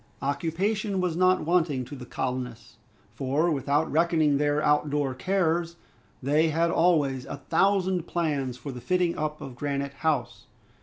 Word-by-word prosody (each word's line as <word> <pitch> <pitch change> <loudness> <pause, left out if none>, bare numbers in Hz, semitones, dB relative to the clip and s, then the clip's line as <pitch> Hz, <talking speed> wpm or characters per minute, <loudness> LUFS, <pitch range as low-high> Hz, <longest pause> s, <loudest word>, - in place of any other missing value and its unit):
Occupation 190 +9 -1
was 180 -3 0
not 185 -1 +3
wanting 160 -7 +1
to 145 - -9
the 125 -2 -9
colonists, 125 -3 -4 0.4
for 145 +6 0
without 145 +2 0
reckoning 160 -3 +3
their 145 0 +2
out 150 0 +2
door 145 -2 0
cares, 170 +1 0 0.5
they 150 +4 +3
had 165 +2 +1
always 145 -8 +2
a - - -5
thousand 185 +4 +1
plans 145 -7 -1
for 140 +2 -7
the 125 -1 -8
fitting 180 +1 +1
up 150 0 -3
of 130 - -8
Granite 140 +1 -3
House. 145 -2 -2
150 Hz, 150 wpm, -27 LUFS, 140-170 Hz, 0.5 s, not